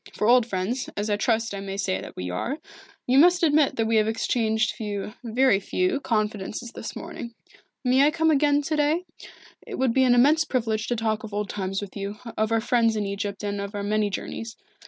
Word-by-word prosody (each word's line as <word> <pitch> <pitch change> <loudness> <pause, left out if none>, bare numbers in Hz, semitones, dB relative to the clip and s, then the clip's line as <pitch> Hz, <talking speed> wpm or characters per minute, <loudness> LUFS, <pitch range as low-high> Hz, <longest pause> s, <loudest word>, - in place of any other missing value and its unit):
For - - -1
old 240 0 +5
friends, 210 +5 -2
as 210 +1 -1
I - - +3
trust 225 +1 0
I 200 - -4
may 195 0 -5
say 95 - -1
that - - -10
we 90 0 -4
are, 245 - -2 0.5
you 260 +2 +4
must 350 +3 +5
admit 300 -3 +3
that 225 - 0
we 225 0 +2
have 215 0 +3
exchanged 220 0 +1
few 210 -1 -5
very 240 -2 +3
few 365 - 0
confidences 215 -1 -2
this - - -7
morning. 235 -1 -7 0.5
May 260 +2 +4
I - - +5
come 320 0 +2
again 290 0 +3
to 310 +2 -1
day? 305 +4 +1 0.6
It 440 -5 -7
would 260 -3 +1
be 265 - +4
an 245 -1 +5
immense 295 +6 +5
privilege 225 -6 -1
to 240 - 0
talk 220 -1 -1
of 215 -2 -7
old 205 -1 -2
times 195 0 -3
with 200 - -9
you, 200 0 -4 0.2
of 215 +1 0
our 225 0 +2
friends 230 -1 +2
in 210 -1 -1
Egypt 200 0 -4
and 200 -1 -2
of 200 +1 -6
our 200 - -3
many 210 0 +1
journeys. 225 +3 -6
225 Hz, 220 wpm, -25 LUFS, 205-260 Hz, 0.6 s, old